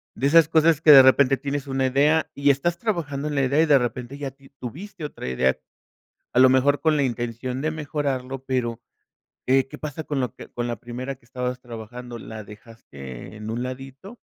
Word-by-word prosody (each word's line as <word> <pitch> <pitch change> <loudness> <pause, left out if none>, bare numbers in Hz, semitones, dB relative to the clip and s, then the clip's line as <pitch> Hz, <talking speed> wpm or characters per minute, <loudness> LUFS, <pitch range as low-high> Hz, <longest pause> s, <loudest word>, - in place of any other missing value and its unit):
De 135 - +1
esas 165 +1 +6
cosas 160 -1 +4
que 155 - +7
de 135 -2 +11
repente 130 +1 +5
tienes 140 +1 -4
una 135 -1 0
idea 150 +5 +2
y 140 0 +4
estás 170 +6 -1
trabajando 155 -9 -2
en 150 - -3
la 140 - +2
idea 140 +4 +3
y - - +4
de 145 -3 +5
repente, 125 +2 -4
ya 140 -2 -5
ti 135 0 -20
tuviste 165 - -8
otra 145 - -7
idea, 65 +1 +1 0.8
a - - +3
lo 130 - +8
mejor 135 +2 +3
con 160 -1 +3
la 140 - +2
intención 120 +1 -3
de 155 +2 0
mejorarlo 140 -4 -3
pero, 120 -3 -2 0.7
eh, 130 0 +3
¿qué - - -10
pasa 155 +1 -6
con 145 -2 -2
lo 125 -3 -2
que - - -11
con 120 0 -3
la 120 - -2
primera 125 +4 -6
que 125 - -31
estabas 125 +1 -4
trabajando?, 120 +1 -8
la 110 -1 -8
dejaste 100 - -11
en 110 +1 -6
un 120 +2 -3
ladito, 135 - -9
135 Hz, 205 wpm, -24 LUFS, 120-145 Hz, 0.8 s, de